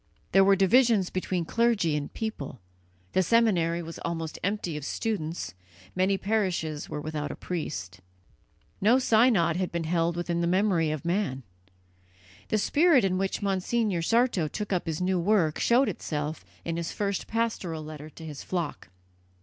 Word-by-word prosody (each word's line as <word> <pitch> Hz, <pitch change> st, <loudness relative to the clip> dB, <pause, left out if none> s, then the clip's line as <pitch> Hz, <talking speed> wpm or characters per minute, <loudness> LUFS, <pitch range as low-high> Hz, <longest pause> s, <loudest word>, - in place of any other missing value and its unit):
There 195 Hz, +1 st, +6 dB
were 195 Hz, 0 st, +5 dB
divisions 200 Hz, 0 st, +4 dB
between 185 Hz, -2 st, -2 dB
clergy 225 Hz, -6 st, +2 dB
and 145 Hz, -1 st, -3 dB
people; 215 Hz, -, -5 dB, 0.5 s
the 185 Hz, -, +3 dB
seminary 175 Hz, -6 st, +2 dB
was 165 Hz, 0 st, -8 dB
almost 165 Hz, -2 st, -4 dB
empty 200 Hz, -4 st, -1 dB
of 150 Hz, -, -5 dB
students; 165 Hz, -, -3 dB, 0.4 s
many 190 Hz, +1 st, +2 dB
parishes 185 Hz, -8 st, -1 dB
were 150 Hz, -, -4 dB
without 150 Hz, -1 st, -4 dB
a -, -, -5 dB
priest; 150 Hz, -, -5 dB, 0.8 s
no 225 Hz, +6 st, +5 dB
synod 220 Hz, -9 st, +3 dB
had 185 Hz, -1 st, -1 dB
been 170 Hz, -1 st, -2 dB
held 165 Hz, +1 st, 0 dB
within 175 Hz, 0 st, -1 dB
the 170 Hz, -, +1 dB
memory 180 Hz, -3 st, +2 dB
of 155 Hz, 0 st, -4 dB
man. 170 Hz, -7 st, -1 dB, 1.0 s
The 215 Hz, -, +1 dB
spirit 290 Hz, -, +4 dB
in 185 Hz, -1 st, 0 dB
which 195 Hz, +2 st, -2 dB
Monsignor 195 Hz, 0 st, 0 dB
Sarto 225 Hz, -3 st, +2 dB
took 205 Hz, +5 st, -4 dB
up 180 Hz, -, -1 dB
his 160 Hz, +1 st, -2 dB
new 185 Hz, 0 st, +1 dB
work 170 Hz, -4 st, +2 dB
showed 245 Hz, +3 st, +4 dB
itself 150 Hz, -, -3 dB, 0.2 s
in 165 Hz, -, -2 dB
his 170 Hz, -1 st, -3 dB
first 200 Hz, -2 st, -2 dB
pastoral 220 Hz, -8 st, -2 dB
letter 155 Hz, 0 st, -8 dB
to 160 Hz, +1 st, -11 dB
his 150 Hz, -3 st, -7 dB
flock. 170 Hz, -, -4 dB
180 Hz, 160 wpm, -27 LUFS, 160-210 Hz, 1.0 s, There